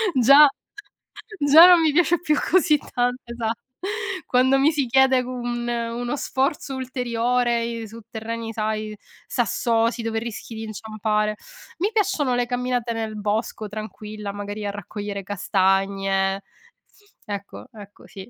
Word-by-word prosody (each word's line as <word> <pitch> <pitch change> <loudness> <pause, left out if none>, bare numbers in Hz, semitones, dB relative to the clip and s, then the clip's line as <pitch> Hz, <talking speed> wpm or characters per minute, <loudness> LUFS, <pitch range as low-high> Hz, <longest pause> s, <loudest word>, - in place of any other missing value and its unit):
già 275 +4 +8 0.9
già 300 +5 +8
non 350 -2 +7
mi 315 -2 +3
piace 350 +1 +3
più 305 -3 +2
così 330 -4 +4
tanto, 245 -2 -1
esatto. 235 -1 -3 0.7
Quando 260 +2 +3
mi 295 +4 +4
si 285 -5 -1
chiede 265 +1 +4
un 240 -1 -4
uno 240 +2 -2
sforzo 270 +1 -1
ulteriore 240 -2 -1
su 225 +2 -11
terreni, 225 0 -5
sai, 215 0 -3 0.3
sassosi, 230 0 0
dove 225 0 -2
rischi 230 0 -7
di 220 - -6
inciampare 215 -1 -2 0.4
mi 405 +5 0
piacciono 385 - +1
le 245 0 +1
camminate 245 -1 -1
nel 220 -1 -4
bosco, 215 +1 -2
tranquilla, 215 -1 -7
magari 205 +1 -6
a 200 - -1
raccogliere 205 0 -6
castagne, 195 0 0 0.8
ecco, 200 -2 -7
ecco, 205 -2 -13
sì. 195 +3 -11
230 Hz, 130 wpm, -23 LUFS, 215-255 Hz, 0.9 s, già